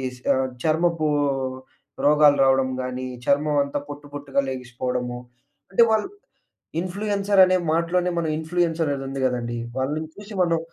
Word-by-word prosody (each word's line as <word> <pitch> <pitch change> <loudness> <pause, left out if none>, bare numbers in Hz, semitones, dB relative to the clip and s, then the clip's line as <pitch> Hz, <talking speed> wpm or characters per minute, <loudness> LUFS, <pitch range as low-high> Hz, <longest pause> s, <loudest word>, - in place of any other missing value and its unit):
స్ - - -16
ఆహ్, 130 0 +1 0.2
చర్మపు 160 0 +1 1.0
రోగాలు 150 -1 +6
రావడం 135 0 +3
గాని, 130 0 -4 0.2
చర్మం 145 +1 +2
అంతా 140 +1 -3
పొట్టు, 145 0 -8
పొట్టుగా 140 -1 -2
లెగిసిపోవడము. 125 -1 -3 0.5
అంటే 215 +4 +6
వాళ్ళు, 220 -1 +2 0.7
ఇన్ఫ్లుయెన్సర్ 200 +2 0
అనే 185 0 +3 0.2
మాటలోనే 175 +2 +1
మనం 165 -1 -1
ఇన్ఫ్లుయెన్స్ 165 +1 -1
అనేది 140 -2 -2
ఉంది 135 0 -4
గదండీ! 120 -2 -2 0.2
వాళ్ళని 150 +4 -2
చూసి 205 +1 -10
మనం 170 -2 +2
150 Hz, 135 wpm, -23 LUFS, 130-175 Hz, 1.0 s, రోగాలు